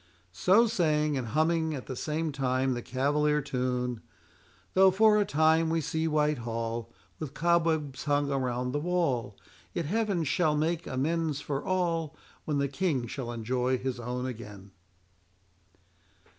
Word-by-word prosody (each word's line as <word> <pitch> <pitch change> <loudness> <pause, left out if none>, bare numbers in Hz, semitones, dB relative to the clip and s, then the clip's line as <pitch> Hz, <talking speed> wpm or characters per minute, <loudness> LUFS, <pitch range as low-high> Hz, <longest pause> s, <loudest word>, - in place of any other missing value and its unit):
So 190 - +4
saying, 155 -7 +1
and 130 -3 -2
humming 160 +3 +1
at 130 - -7
the 130 - -5
same 155 +4 -2
time 130 -1 0
the 120 - -3
cavalier 145 +4 +1
tune,— 125 -3 -2 0.7
"Though 190 0 +7
for 210 +2 +5
a - - +2
time 160 0 +3
we 165 0 +1
see 160 +1 -1
Whitehall 120 -7 -1 0.3
With 155 -4 -6
cobwebs 160 -5 +1
hung 145 -1 +1
around 125 -2 -1
the 145 - -1
wall, 145 - -1 0.4
Yet 170 - -2
Heaven 200 0 0
shall 155 +1 +1
make 160 +2 -1
amends 155 +2 -1
for 145 -1 -3
all. 165 -4 -1 0.3
When 150 -2 0
the 140 0 +1
King 140 -3 -1
shall 120 0 -5
enjoy 125 +2 0
his 125 -1 -3
own 125 +1 -3
again." 105 -6 -8
145 Hz, 145 wpm, -29 LUFS, 125-165 Hz, 0.7 s, Though